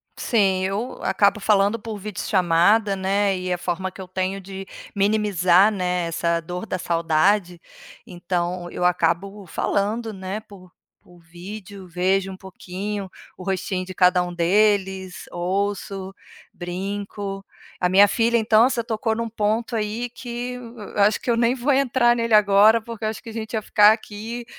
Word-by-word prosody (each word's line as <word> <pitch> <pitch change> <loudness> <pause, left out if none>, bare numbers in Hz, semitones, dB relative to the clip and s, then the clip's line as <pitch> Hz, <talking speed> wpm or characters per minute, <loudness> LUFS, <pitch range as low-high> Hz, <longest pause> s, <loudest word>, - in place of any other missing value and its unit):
Sim, 195 -5 +1
eu 205 +6 -3
acabo 200 +2 +2
falando 205 +1 +2
por 220 -1 -7
videochamada, 195 +1 +2
né, 195 0 +1
e 180 0 -2
a - - -1
forma 180 +1 -3
que 190 - -11
eu 185 - -8
tenho 185 +1 -3
de 195 0 -8 0.3
minimizar, 200 -2 +3
né, 180 -3 -1
essa 170 0 0
dor 175 +4 -6
da 185 - -3
saudade. 170 +2 +1 0.4
Então 175 0 -3
eu - - -4
acabo 180 +3 0
falando, 215 +5 -1
né, 190 +1 -5
por 185 -4 -16 0.3
por 175 -1 -20
vídeo, 190 +3 -10
vejo 190 +2 0
um 190 - -7
pouquinho 190 +1 -6 0.3
o - - -11
rostinho 185 -1 -2
de 185 - -8
cada 180 0 +4
um 175 0 -4
deles, 190 +1 +1
ouço, 195 +1 -3 0.4
brinco. 195 +2 -5 0.3
A 180 - +2
minha 200 +3 +6
filha 235 +3 +1
então, 225 +2 +4
você 240 -3 -1
tocou 225 -1 -1
em 230 - -3
um 230 - -3
ponto 220 +2 -1
aí 225 +2 -2
que 245 +1 -6 0.4
acho 205 +1 +3
que 245 - -1
eu 230 - +1
nem 240 +2 +2
vou 260 +3 0
entrar 260 -3 +3
nele 230 -1 -1
agora 210 +2 +6
porque 225 -1 -7
eu - - +1
acho 220 - -7
que 230 - -9
a - - -9
gente 220 0 -6
ia 220 - 0
ficar 210 +1 +6
aqui 225 +2 -7
195 Hz, 165 wpm, -23 LUFS, 185-215 Hz, 0.4 s, minha